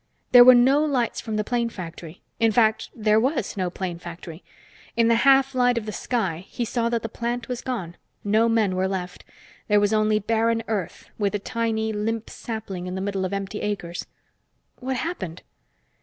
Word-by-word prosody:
There 245 Hz, -1 st, +10 dB
were 255 Hz, 0 st, +9 dB
no 265 Hz, +5 st, +5 dB
lights 260 Hz, -6 st, 0 dB
from 220 Hz, -2 st, -4 dB
the 210 Hz, -, 0 dB
plane 235 Hz, +1 st, -1 dB
factory. 170 Hz, -4 st, -9 dB, 0.2 s
In 225 Hz, -1 st, +4 dB
fact, 220 Hz, 0 st, +2 dB
there 215 Hz, -1 st, +3 dB
was 260 Hz, -2 st, -1 dB
no 185 Hz, -3 st, -1 dB
plane 175 Hz, -1 st, -5 dB
factory. 170 Hz, -1 st, -9 dB, 0.5 s
In 230 Hz, 0 st, +4 dB
the 230 Hz, -, +4 dB
half 270 Hz, 0 st, +5 dB
light 245 Hz, -1 st, +3 dB
of 225 Hz, -, -2 dB
the 215 Hz, -, -4 dB
sky, 190 Hz, -6 st, -2 dB
he 240 Hz, -, -3 dB
saw 235 Hz, 0 st, -1 dB
that 235 Hz, -1 st, -1 dB
the -, -, -2 dB
plant 235 Hz, +1 st, -4 dB
was 250 Hz, -1 st, -4 dB
gone. 190 Hz, -10 st, -4 dB, 0.3 s
No 220 Hz, +3 st, +3 dB
men 215 Hz, -5 st, +2 dB
were 185 Hz, +1 st, +1 dB
left. 180 Hz, -2 st, -5 dB, 0.4 s
There 210 Hz, -1 st, +4 dB
was 205 Hz, +1 st, +2 dB
only 215 Hz, 0 st, +3 dB
barren 225 Hz, +2 st, +1 dB
earth, 205 Hz, -6 st, -4 dB
with 205 Hz, 0 st, 0 dB
a -, -, +2 dB
tiny, 220 Hz, 0 st, -2 dB
limp 220 Hz, +2 st, -3 dB
sapling 200 Hz, -6 st, -6 dB
in 180 Hz, -, -4 dB
the -, -, -3 dB
middle 195 Hz, -1 st, -2 dB
of 185 Hz, -, -3 dB
empty 200 Hz, +1 st, -4 dB
acres. 180 Hz, -4 st, -4 dB, 0.7 s
"What 260 Hz, +1 st, -3 dB
happened?" 195 Hz, -, -5 dB
220 Hz, 190 wpm, -24 LUFS, 195-235 Hz, 0.7 s, There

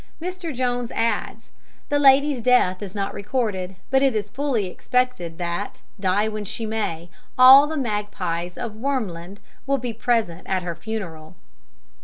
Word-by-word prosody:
Mr. 360 Hz, 0 st, -5 dB
Jones 245 Hz, -2 st, -1 dB
adds: 230 Hz, 0 st, -2 dB, 0.4 s
"The 290 Hz, -, +2 dB
lady's 280 Hz, -1 st, +5 dB
death 225 Hz, -7 st, +3 dB
is 200 Hz, -1 st, -7 dB
not 195 Hz, -1 st, -2 dB
recorded; 200 Hz, -4 st, -2 dB, 0.2 s
but 265 Hz, 0 st, +4 dB
it 270 Hz, -4 st, +3 dB
is 205 Hz, -1 st, -2 dB
fully 260 Hz, -5 st, -1 dB
expected 185 Hz, -4 st, -1 dB
that, 175 Hz, +3 st, -4 dB, 0.2 s
die 195 Hz, +2 st, +2 dB
when 215 Hz, -1 st, -4 dB
she 220 Hz, +3 st, -4 dB
may, 175 Hz, -6 st, -3 dB, 0.3 s
all 265 Hz, +3 st, +9 dB
the 315 Hz, +1 st, -3 dB
magpies 205 Hz, -, -3 dB
of 235 Hz, -3 st, -4 dB
Wermland 205 Hz, -8 st, -3 dB, 0.3 s
will 275 Hz, 0 st, +2 dB
be 245 Hz, -2 st, -4 dB
present 225 Hz, -7 st, 0 dB
at 185 Hz, -1 st, -1 dB
her 175 Hz, -1 st, -3 dB
funeral." 170 Hz, -4 st, -7 dB
220 Hz, 150 wpm, -23 LUFS, 185-255 Hz, 0.4 s, all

